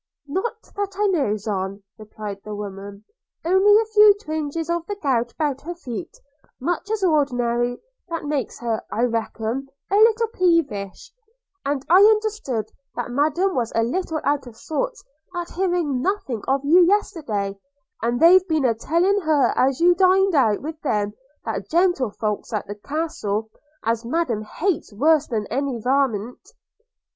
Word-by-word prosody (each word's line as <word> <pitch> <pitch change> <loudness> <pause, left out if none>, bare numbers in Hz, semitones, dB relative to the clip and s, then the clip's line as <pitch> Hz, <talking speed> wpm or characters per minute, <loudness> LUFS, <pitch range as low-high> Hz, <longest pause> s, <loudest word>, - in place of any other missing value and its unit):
'Not 410 +9 -3
that 400 -1 -3
I 415 - +2
knows 265 - 0
on,' 195 -1 -3 0.2
replied 210 -2 -7
the 210 -1 -6
woman 200 0 -8 0.2
– - - -39
'Only 385 +4 +5
a 450 - +1
few 420 -1 +6
twinges 315 -3 -4
of 340 0 -1
the 410 - -3
gout 250 - 0
about 290 -4 -2
her 345 +3 -6
feet, 330 0 -7 0.4
much 350 +7 -2
as 435 -2 -1
ordinary, 245 -7 +1 0.3
that 330 -2 -4
makes 290 -6 -2
her, 230 -2 -1
I 230 - 0
reckon, 230 +2 -2 0.2
a - - +3
little 450 +1 +5
peevish: 330 - 0 0.5
and 280 -1 -2
I 350 - +6
understood 420 - +2 0.2
that 245 0 -4
Madam 310 +8 +1
was 235 -3 -1
a 225 - +3
little 320 +6 -2
out 285 -2 0
of 225 -2 -12
sorts 300 +2 -3 0.3
at 350 -1 -4
hearing 345 -8 0
nothing 285 - -2
of 275 +1 +1
you 345 +5 +6
yesterday; 265 - 0 0.4
and 240 +1 0
they've 365 +3 +6
been 315 -4 +1
a 235 - +3
telling 340 - +1
her 310 -5 +2
as 265 0 +2
how 340 - +3
you 355 - +7
dined 380 +1 +4
out 235 -7 +2
with 315 +1 -6
them 210 -7 -1 0.3
there 220 -3 -2
gentlefolks 250 - 0
at 215 - -2
the 205 - -6
Castle, 220 -4 -3 0.3
as 230 +1 0
Madam 245 -4 -1
hates 320 - -2
worse 295 +7 +3
than 220 -4 -2
any 270 -2 -1
varmint.' 250 - -1
280 Hz, 160 wpm, -22 LUFS, 225-350 Hz, 0.5 s, you